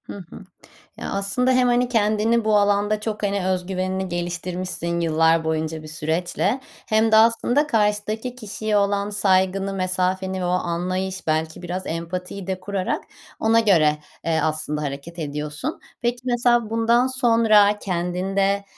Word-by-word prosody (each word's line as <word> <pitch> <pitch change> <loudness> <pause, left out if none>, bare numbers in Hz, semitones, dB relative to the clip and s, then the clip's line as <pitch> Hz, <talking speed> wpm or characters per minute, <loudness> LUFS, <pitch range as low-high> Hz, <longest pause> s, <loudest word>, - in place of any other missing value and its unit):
Hı - - -9 0.2
hı. - - -11 0.5
Ya - - -5
aslında 200 +6 0
hem, 255 0 +3
hani, 245 0 +2
kendini 220 0 +2
bu 215 -1 +3
alanda 205 +1 +2
çok, 215 0 -4
hani, 200 -2 0
öz 185 -1 -1
güvenini 190 0 -2
geliştirmişsin 175 0 -3
yıllar 165 0 +3
boyunca 160 0 -2
bir 155 - -10
süreçle 165 - -1 0.3
hem 220 0 +2
de - - +7
aslında 235 +6 +4
karşıdaki 215 0 0
kişiye 215 -2 -3
olan 200 0 +1
saygını, 195 -1 +1
mesafeni 185 0 -1
ve - - -2
o - - 0
anlayış 185 +2 -2
belki 160 +1 -1
biraz 180 +2 -4
empatiyi 180 +3 -5
de 190 -1 -3
kurarak 195 -1 -2 0.3
ona 225 +1 +4
göre, 160 -9 +3 0.3
eee, 165 -1 +1
aslında 155 -1 -2
hareket 145 +4 -6
ediyorsun. 150 -1 -4 0.2
Peki 240 0 0
mesela 240 -2 +2
bundan 230 +2 +3
sonra 230 -5 +4
kendinde, 195 +2 -1
190 Hz, 145 wpm, -22 LUFS, 175-215 Hz, 0.5 s, de